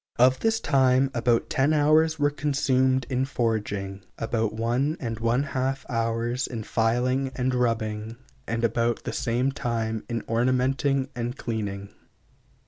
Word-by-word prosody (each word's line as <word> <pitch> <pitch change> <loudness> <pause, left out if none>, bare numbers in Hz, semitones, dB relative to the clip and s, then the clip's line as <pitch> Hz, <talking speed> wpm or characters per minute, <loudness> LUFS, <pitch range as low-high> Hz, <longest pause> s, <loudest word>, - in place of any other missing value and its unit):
Of 130 +2 +5
this 225 0 +1
time, 135 - +3
about 120 -1 +1
ten 140 +3 +2
hours 155 +2 +4
were 145 -1 +2
consumed 130 -3 +1
in 130 -1 0
forging, 105 -7 -2 0.2
about 115 -1 -1
one 120 +8 0
and 115 -3 -4
one 115 +4 +1
half 135 -1 -2
hours 115 +2 -1
in 115 -3 -5
filing 125 +5 0
and 130 0 0
rubbing, 115 -2 -1 0.3
and 115 +1 -2
about 115 +1 +1
the - - -4
same 125 +3 0
time 115 -4 -2
in 115 -2 -2
ornamenting 130 +3 +1
and 120 +2 -3
cleaning. 100 -4 -4
125 Hz, 135 wpm, -26 LUFS, 115-135 Hz, 0.3 s, Of